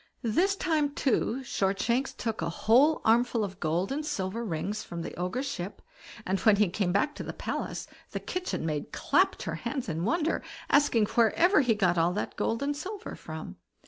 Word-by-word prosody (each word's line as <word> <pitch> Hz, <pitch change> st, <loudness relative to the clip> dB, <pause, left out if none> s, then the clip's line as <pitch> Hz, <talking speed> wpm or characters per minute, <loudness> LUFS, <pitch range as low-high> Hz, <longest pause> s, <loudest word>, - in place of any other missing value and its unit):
This 350 Hz, -, +2 dB
time, 305 Hz, -6 st, 0 dB
too, 265 Hz, -1 st, +1 dB
Shortshanks 235 Hz, +4 st, 0 dB
took 225 Hz, -5 st, -3 dB
a 165 Hz, -, -1 dB
whole 255 Hz, -, +4 dB
armful 230 Hz, 0 st, +3 dB
of 195 Hz, -2 st, -5 dB
gold 170 Hz, +6 st, 0 dB
and 295 Hz, +3 st, -1 dB
silver 200 Hz, -4 st, -2 dB
rings 205 Hz, +2 st, -3 dB
from 170 Hz, -1 st, -6 dB
the -, -, -6 dB
Ogre's 180 Hz, +10 st, -2 dB
ship, 200 Hz, -8 st, -5 dB, 0.5 s
and 190 Hz, +1 st, 0 dB
when 215 Hz, -2 st, +5 dB
he 205 Hz, -2 st, +3 dB
came 185 Hz, 0 st, 0 dB
back 245 Hz, +11 st, +1 dB
to -, -, -6 dB
the -, -, -5 dB
palace -, -, -4 dB, 0.2 s
the -, -, -4 dB
kitchen 365 Hz, -, -3 dB
maid 150 Hz, -2 st, -3 dB
clapped -, -, +2 dB
her -, -, -3 dB
hands 265 Hz, -4 st, -3 dB
in 165 Hz, -1 st, -2 dB
wonder, 325 Hz, -, +1 dB, 0.3 s
asking 275 Hz, -6 st, +4 dB
wherever 305 Hz, -, +4 dB
he 240 Hz, -5 st, +2 dB
got 180 Hz, -4 st, +2 dB
all 170 Hz, +2 st, +3 dB
that 205 Hz, -, -3 dB
gold 230 Hz, +4 st, -1 dB
and 290 Hz, +1 st, 0 dB
silver 395 Hz, +8 st, -6 dB
from. -, -, -8 dB
225 Hz, 185 wpm, -29 LUFS, 190-285 Hz, 0.5 s, when